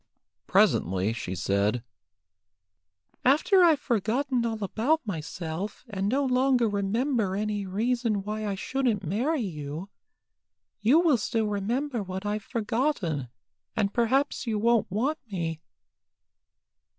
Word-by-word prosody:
Presently 95 +5 +3
she 95 -5 -4
said 100 +5 0 1.4
"After 310 +8 +5
I've 320 -4 +5
forgotten 245 +2 0
all 220 -2 -3
about 255 +10 +1
myself, 175 +2 -5
and 200 -3 -2
no 275 +4 +1
longer 255 -2 +3
remember 205 +1 0
any 205 -1 -2
reason 225 +1 0
why 215 +1 -3
I 200 - -1
shouldn't 235 -1 -1
marry 250 - 0
you, 160 -1 -5 0.9
you 250 +10 +5
will 320 -7 +4
still 225 +1 -1
remember 230 +6 -1
what 190 0 -5
I've 210 +1 -1
forgotten, 215 - -1 0.5
and 205 -2 0
perhaps 260 +3 +1
you 220 -2 0
won't 230 +1 +2
want 260 - 0
me." 165 -4 -3
215 Hz, 115 wpm, -27 LUFS, 190-255 Hz, 1.4 s, After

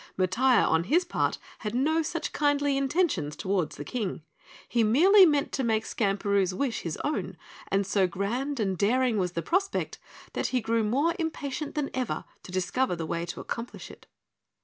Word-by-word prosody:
Matiah, 230 +8 +3
on 160 +1 +2
his 345 - +3
part, 350 - 0 0.2
had 215 0 -4
no 315 +6 +2
such 320 +1 -3
kindly 290 -1 +2
intentions 275 - 0
toward 185 -1 -1
the 145 - -8
King. 205 -9 -3 0.4
He 235 -2 +2
merely 365 - +7
meant 290 -2 +1
to 270 - -1
make 220 -2 +1
Skamperoo's 195 -3 0
wish 260 +1 -1
his 165 -3 -4
own, 295 - -2 0.3
and 195 0 +1
so 195 -1 +2
grand 240 +10 -2
and 195 -3 0
daring 230 +4 +2
was 180 -2 -1
the 170 - -2
prospect 390 +3 -1 0.3
that - - -1
he 255 - 0
grew 225 0 0
more 275 +10 +2
impatient 300 -2 -3
than 295 -2 -1
ever 255 -2 -2 0.2
to - - -11
discover 185 +5 0
the 165 -1 -4
way 170 +1 -3
to - - -5
accomplish 235 +1 -6
it. - - -16
235 Hz, 175 wpm, -28 LUFS, 195-285 Hz, 0.4 s, merely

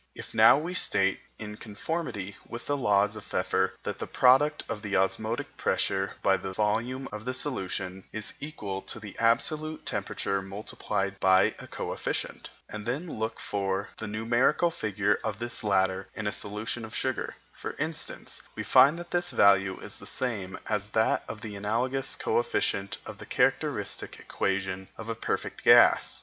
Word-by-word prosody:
If - - -9
now - - +8
we 165 +5 -3
state, 95 - +3 0.2
in 105 -1 -7
conformity 105 - -4
with 120 0 -7
the 145 - 0
laws 105 -5 +3
of 105 - -8
Pfeffer, - - 0
that - - -4
the - - -4
product 135 +4 +4
of 105 - -4
the 105 -2 0
osmotic 115 +10 -1
pressure 95 +1 0
by 95 -1 +4
the 95 - -5
volume 115 +6 0
of 105 0 -6
the 130 +2 -3
solution 95 -8 -3
is 110 -1 -2
equal 105 -11 -5
to 115 - -6
the 105 -3 -9
absolute 155 +7 +1
temperature 100 0 -1
multiplied 100 0 -3
by 95 0 +5
a - - -9
coefficient, - - -4 0.2
and 105 0 -7
then 145 +2 -3
look 110 0 -2
for 100 0 -2
the 110 - -4
numerical 120 +10 +2
figure 105 -6 0
of 110 -2 -2
this 120 +1 -2
latter 95 -2 +2
in 110 - -4
a 105 - +1
solution 105 +4 -3
of 110 0 -8
sugar, 130 -1 -2 0.2
for - - -6
instance, - - -3
we - - -3
find 140 +5 +6
that 175 0 -8
this 175 0 +2
value 95 - +4
is - - -6
the - - -9
same 105 -7 -2
as 105 -1 -1
that 110 +1 +2
of 110 - -7
the 105 -2 -6
analogous 120 +6 0
coefficient 100 0 0
of - - -8
the - - -8
characteristic - - 0
equation 95 -1 -2
of 115 0 -7
a - - 0
perfect 115 - -3
gas. - - +6
105 Hz, 165 wpm, -28 LUFS, 100-125 Hz, 0.2 s, now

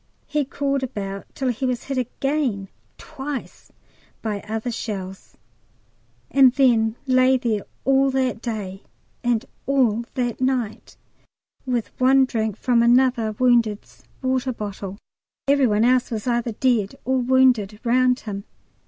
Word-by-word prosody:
He 300 -2 -1
crawled 275 0 -1
about 200 -6 -5
till 265 -2 -1
he 245 +2 -3
was 250 -2 -1
hit 270 -2 -2
again 255 -5 -2 0.3
twice 285 -3 -7 0.5
by 210 -2 -2
other 225 +3 -3
shells, 195 -4 -6 0.9
and 265 -2 +6
then 230 -5 +3
lay 255 0 +4
there 230 -5 -2 0.2
all 270 0 +4
that 260 -3 -1
day 205 -5 -5 0.4
and 240 -2 +1 0.2
all 245 -5 +2
that 245 -2 -2
night, 255 -5 -2 0.7
with 245 -3 -1
one 265 +1 +5
drink 220 -4 -2
from 240 -1 +2
another 240 -2 +3
wounded's 230 -3 +1 0.2
water 260 0 0
bottle; 200 -3 -6 0.5
every 280 -2 +4
one 215 +1 +2
else 250 0 +3
was 220 -3 -4
either 240 -2 0
dead 230 -4 +1
or 260 0 +1
wounded 245 -5 +3
round 250 +1 +3
him. 200 -2 -6
245 Hz, 130 wpm, -22 LUFS, 220-260 Hz, 0.9 s, and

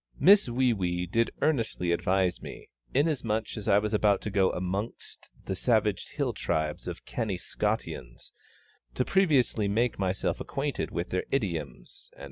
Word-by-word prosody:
Miss 200 -6 +6
WEE 125 0 +2
WEE 90 -3 -1
did 115 +6 +1
earnestly 115 - +1
advise 90 +1 +1
me, - - -9 0.2
inasmuch 125 -7 0
as 105 -3 -6
I 100 - +5
was 105 +1 0
about 105 -1 +3
to 105 - -4
go 95 -2 +3
amongst 95 +5 -4 0.2
the 95 - -2
savage 105 -2 +1
hill 140 -5 0
tribes 80 -6 -2
of - - -6
canny 105 -5 -2
Scotians, - - -4 0.6
to - - +1
previously 140 - +3
make 115 +3 +1
myself 95 0 -1
acquainted 140 -1 -2
with 85 +1 -3
their 90 - -1
idioms, 85 - -2
&c. - - -19
105 Hz, 150 wpm, -28 LUFS, 90-120 Hz, 0.6 s, Miss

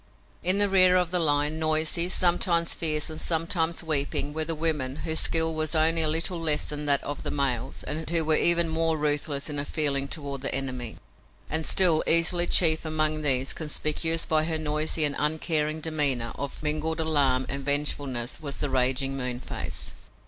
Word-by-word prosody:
In 185 +2 +2
the 205 0 +2
rear 185 -2 +5
of 180 -2 -1
the 180 - +1
line, 150 0 +1
noisy, 160 +2 0
sometimes 175 -2 +2
fierce 155 -2 -1
and 155 0 -5
sometimes 165 0 0
weeping, 145 -2 -1
were 160 +1 -1
the 165 +1 -4
women, 150 -5 -1
whose 160 -1 0
skill 160 0 +1
was 155 +1 -3
only 160 +1 +3
a 160 - +3
little 165 +3 0
less 155 -2 0
than 150 0 -4
that 140 -1 +1
of 145 0 -5
the - - -5
males 130 -3 -1
and 155 +1 -5
who 165 -1 0
were 155 0 +2
even 170 +1 +5
more 160 0 0
ruthless 145 -1 -1
in 145 -2 -3
all - - -2
feeling 140 -2 -1
toward 140 -3 -5
the 135 - 0
enemy. 130 -4 -4 0.5
And 160 +1 -1
still 175 -5 +4
easily 175 +1 +4
chief 160 -3 +5
among 155 -1 0
these, 135 -3 +1
conspicuous 160 +1 -1
by 155 -1 +1
her 160 -1 -2
noisy 155 +1 -1
and 145 -1 +2
uncaring 155 0 -1
demeanor 145 -7 0
of 140 +1 -7
mingled 155 +2 -2
alarm 140 -5 0
and 140 0 -5
vengefulness, 140 -3 -2
was 140 -3 -6
the 145 - -2
raging 130 +1 0
Moonface. 125 -1 -5
155 Hz, 180 wpm, -25 LUFS, 140-165 Hz, 0.5 s, rear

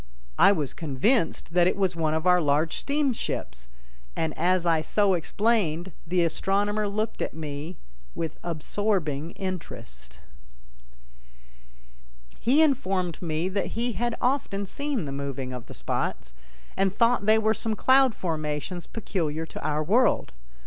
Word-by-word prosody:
I - - +8
was 150 -9 -1
convinced 165 - 0
that 175 0 +5
it - - +1
was 190 -3 +1
one 160 -2 0
of 160 +2 -2
our 180 -1 +5
large 150 +2 +1
steamships, 270 - -2 0.5
and 160 -1 -1
as 180 +1 +2
I 165 -2 +3
so 200 +4 +2
explained 185 -1 0 0.2
the 175 +1 +2
astronomer 205 +5 0
looked 215 +2 -2
at - - -3
me 155 +2 -6 0.4
with 165 -2 -4
absorbing 165 -2 -1
interest. 65 - -7 2.2
He 275 +7 +4
informed 195 - 0
me 165 0 -1
that 200 +3 -2
he 240 +1 0
had 235 +3 -1
often 245 -6 0
seen 280 - -2
the 140 - -5
moving 135 -2 -4
of 125 -2 -7
the - - -10
spots, - - -3 0.4
and 195 0 +2
thought 230 0 +2
they 220 +1 +6
were 220 0 +2
some 220 -1 -1
cloud 260 -1 +4
formations 160 +1 -3
peculiar 165 -8 -2
to - - -9
our 150 +1 0
world. 220 - +2
180 Hz, 140 wpm, -26 LUFS, 155-215 Hz, 2.2 s, I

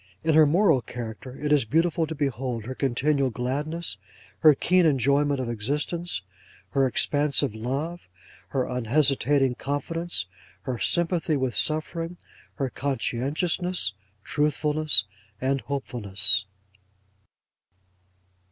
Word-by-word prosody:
In 160 - +2
her 155 -1 +6
moral 160 -4 +3
character, 120 +2 -8
it 150 0 -2
is 150 -4 +4
beautiful 160 +6 +1
to 160 - -5
behold 130 -5 -3
her 130 - -5
continual 135 +1 0
gladness, 140 +4 -3 0.4
her 155 -3 +6
keen 180 +5 +3
enjoyment 140 -1 +2
of 130 - -3
existence, 145 - -2 0.5
her 135 -1 +2
expansive 145 -1 +1
love, 140 +10 -4 0.5
her 130 -2 -1
unhesitating 135 +2 +2
confidence, 145 - -2 0.4
her 125 -4 -4
sympathy 170 -3 +1
with 130 -4 -2
suffering, 165 - -1 0.4
her 135 -4 -2
conscientiousness, 140 - -1 0.3
truthfulness, 150 -3 +2 0.4
and 135 +1 0
hopefulness. 105 -7 +3
140 Hz, 105 wpm, -25 LUFS, 125-155 Hz, 0.5 s, her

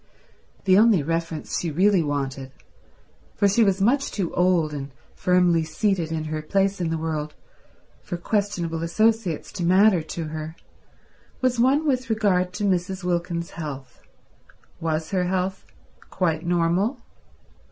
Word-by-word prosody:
The 190 0 +6
only 215 -8 +5
reference 165 0 -2
she 170 - -2
really 185 +4 +3
wanted, 135 -3 -3 0.8
for 200 - +3
she 205 +4 +3
was 195 -2 +2
much 265 +8 +2
too 185 -5 -3
old 180 -4 +2
and 140 -1 -5 0.2
firmly 180 -2 +2
seated 165 +1 -1
in 160 -1 -2
her 155 0 -4
place 195 +4 0
in 170 - 0
the 165 - -1
world 155 -2 -3 0.7
for 175 - -5
questionable 175 -4 -2
associates 215 0 0
to 180 - -5
matter 185 +1 +5
to 160 +2 -5
her, 155 +1 -6 0.8
was 255 -2 +1
one 270 +6 +3
with 260 -3 0
regard 195 -5 +1
to 205 - -4
Mrs. 185 -1 0
Wilkins's 170 -1 -2
health. 140 -6 -8 0.8
Was 160 -1 -2
her 185 -2 +1
health 185 +1 -2 0.4
quite 165 -3 -1
normal? 175 +7 +1
175 Hz, 140 wpm, -24 LUFS, 160-200 Hz, 0.8 s, The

